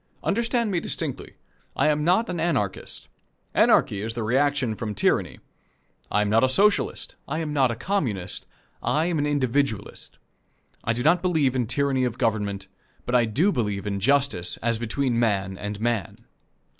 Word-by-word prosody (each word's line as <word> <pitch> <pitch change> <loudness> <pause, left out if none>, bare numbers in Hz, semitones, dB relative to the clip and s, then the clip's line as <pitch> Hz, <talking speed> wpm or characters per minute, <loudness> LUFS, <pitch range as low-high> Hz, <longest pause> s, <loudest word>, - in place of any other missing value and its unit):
Understand 235 +1 0
me 180 - +1
distinctly. - - -5 0.4
I - - +3
am 150 0 +1
not 185 +8 +3
an 180 -2 -3
Anarchist. 130 - -2 0.5
Anarchy 100 - +3
is 115 +1 -4
the 115 - -2
reaction 135 +1 +1
from 105 -1 -5
tyranny. 100 - +1 0.7
I 105 - +2
am - - -1
not 115 +3 +4
a 130 - +4
Socialist. 200 +9 +2
I 155 - -2
am 155 -2 -3
not 135 -3 +3
a 115 - -2
Communist. 115 - -2 0.3
I 155 +2 +1
am 170 -3 0
an 145 - +1
Individualist. 135 -6 -1 0.7
I 115 - +1
do 120 +1 -3
not 170 +3 +4
believe 155 -8 +1
in 125 -3 0
tyranny 135 +1 +1
of 125 -1 -1
government, 105 -4 -1 0.4
but 125 - -3
I 120 -2 +5
do 150 - +2
believe 105 - -2
in 100 -1 -2
justice 135 -6 +1
as 115 -1 -1
between 120 +1 0
man 100 -5 0
and 105 +1 -5
man. 115 -4 -2
125 Hz, 170 wpm, -25 LUFS, 110-150 Hz, 0.7 s, I